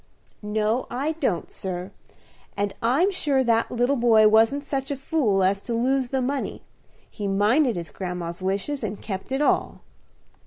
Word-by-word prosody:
"No, 215 +3 -1
I 275 +6 -1
don't, 195 - -1
sir; 185 0 -5 0.7
and 200 -1 -1
I'm 275 - +3
sure 285 -8 +1
that 230 -2 +2
little 245 +3 +1
boy 230 -3 +5
wasn't 225 +6 +4
such 270 -2 -3
a 285 - -1
fool 260 -8 +1
as 195 +1 +2
to 235 - -3
lose 255 +2 +1
the 265 -1 0
money. 275 +2 -3 0.4
He 205 -2 -5
minded 220 +6 +2
his 170 -4 -5
grandma's 180 -1 -5
wishes, 200 +10 -2
and 210 -1 -4
kept 195 +2 -6
it 270 +2 +1
all." - - 0
230 Hz, 160 wpm, -24 LUFS, 195-270 Hz, 0.7 s, boy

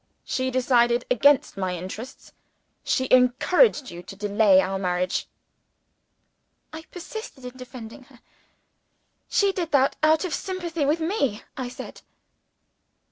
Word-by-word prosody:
She 260 0 -1
decided 245 -1 +2
against 285 -1 +3
my 185 -2 -2
interests; 190 +8 -9 0.5
she 260 - 0
encouraged 255 - +4
you 175 - -8
to 195 - -11
delay 205 -1 +4
our 190 0 -1
marriage." 180 -1 -1 1.5
I 320 +1 -8
persisted 360 - -9
in 250 0 -8
defending 255 -1 -10
her. 255 -3 -20 1.1
"She 400 -1 +3
did 350 -4 -3
that 275 -1 +3
out 315 +3 +3
of 345 - -4
sympathy 345 -5 -3
with 315 +3 +1
me," 290 - -1
I 255 -2 -4
said. - - -10
255 Hz, 125 wpm, -24 LUFS, 220-315 Hz, 1.5 s, encouraged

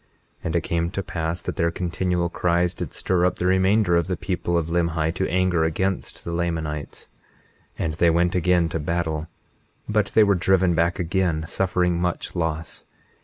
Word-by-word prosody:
21:11 - - -38 0.4
And 80 - -1
it 85 - +3
came 85 0 -1
to 100 +2 -4
pass 85 0 -3
that - - -4
their 85 - +2
continual 90 0 -1
cries 85 +1 +1
did - - -6
stir 90 -2 0
up 90 0 +2
the 90 - -3
remainder 95 0 +3
of 85 +1 +2
the 90 -2 -2
people 85 -3 -1
of 85 - 0
Limhi 85 -2 0
to 95 +2 -1
anger 90 -2 +2
against 95 +4 -2
the 85 - -5
Lamanites; 80 -3 -3 0.7
and 80 - -1
they 85 +2 +3
went 85 +1 +2
again 90 -1 +2
to 80 - -2
battle, 80 0 -2 0.6
but 105 -2 +1
they 110 - +7
were 100 -1 +4
driven 95 -1 +3
back 85 +1 +1
again, 90 -3 0
suffering 90 0 0
much 90 +1 -2
loss. 80 -2 -3
85 Hz, 180 wpm, -23 LUFS, 85-90 Hz, 0.7 s, they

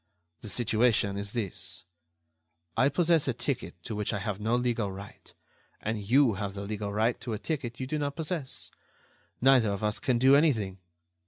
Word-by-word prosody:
The 110 - -7
situation 110 -1 +2
is 100 0 -4
this: 110 -7 -5 0.9
I 135 - +4
possess 165 0 +3
a 130 - 0
ticket 130 +1 -3
to 110 - -4
which 105 +2 -1
I - - 0
have 100 0 -3
no 110 +3 +1
legal 120 -4 0
right, 100 +1 -11 0.5
and 110 0 -2
you 120 +4 +4
have 100 0 -4
the 100 - -4
legal 105 0 -3
right 110 +3 +1
to 120 - -3
a - - -1
ticket 125 -1 -4
you 130 - -2
do 150 +3 -2
not 145 -1 -2
possess. 160 -3 -4 0.7
Neither 130 -4 +5
of 100 +1 -3
us 105 0 0
can 125 -3 +1
do 130 +3 +6
anything. 110 - +2
115 Hz, 180 wpm, -29 LUFS, 105-135 Hz, 0.9 s, do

